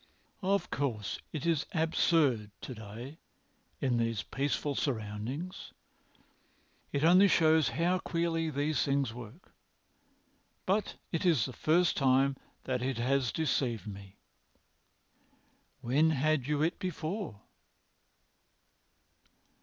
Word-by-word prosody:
Of 195 -1 0
course 115 -8 -2
it 155 -2 -4
is 165 -4 +1
absurd 160 -8 +2
to 130 - -6
day 115 +7 -9 0.6
in 125 -3 +1
these 115 -2 0
peaceful 140 +1 -1
surroundings. 125 - -4 1.2
It 140 +1 -1
only 180 +5 +7
shows 160 -5 +4
how 175 +2 +2
queerly 165 -2 -1
these 145 +1 0
things 140 -4 0
work. 120 - -11 1.1
But 200 +2 0 0.2
it 165 - -1
is 160 - +3
the 130 - -6
first 170 +8 +2
time 135 0 +3 0.3
that 125 -2 -2
it 130 -1 -1
has 130 +1 +1
deceived 130 -7 -1
me." 100 -1 -9 1.7
"When 145 +7 +3
had 155 -2 +1
you 150 0 +1
it 165 +3 0
before?" 175 - -4
140 Hz, 105 wpm, -31 LUFS, 120-165 Hz, 1.7 s, only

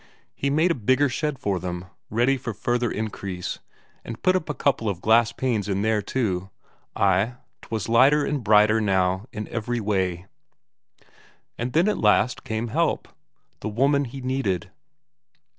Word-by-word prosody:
He 140 - -2
made 160 +5 +3
a - - +4
bigger 130 +3 +2
shed 150 +3 -2
for 100 -5 -1
them, 90 0 -5 0.2
ready 120 +5 +2
for 120 -4 -5
further 120 +3 0
increase, 100 -5 -4 0.4
and 115 -1 -7
put 185 0 +4
a - - +4
couple 140 -6 0
of 95 -4 -3
glass 115 +3 +4
panes 115 -5 -1
in 100 +1 0
there 110 -1 +2
too. 95 -5 -2 0.5
Ay, 100 +5 +2 0.3
'twas 110 -3 -4
lighter 135 +6 +5
and 145 -4 -2
brighter 105 +1 +5
now 95 0 +1
in 105 -3 -5
every 120 +1 -2
way. 95 -4 -1 1.3
And 125 +2 -4
then 170 +5 +3
at 210 - 0
last 110 +3 +2
came 110 +1 -3
help; - - 0 0.5
the 110 - -4
woman 140 +6 +2
he 135 +2 -8
needed. 115 -8 -2
115 Hz, 155 wpm, -24 LUFS, 100-130 Hz, 1.3 s, lighter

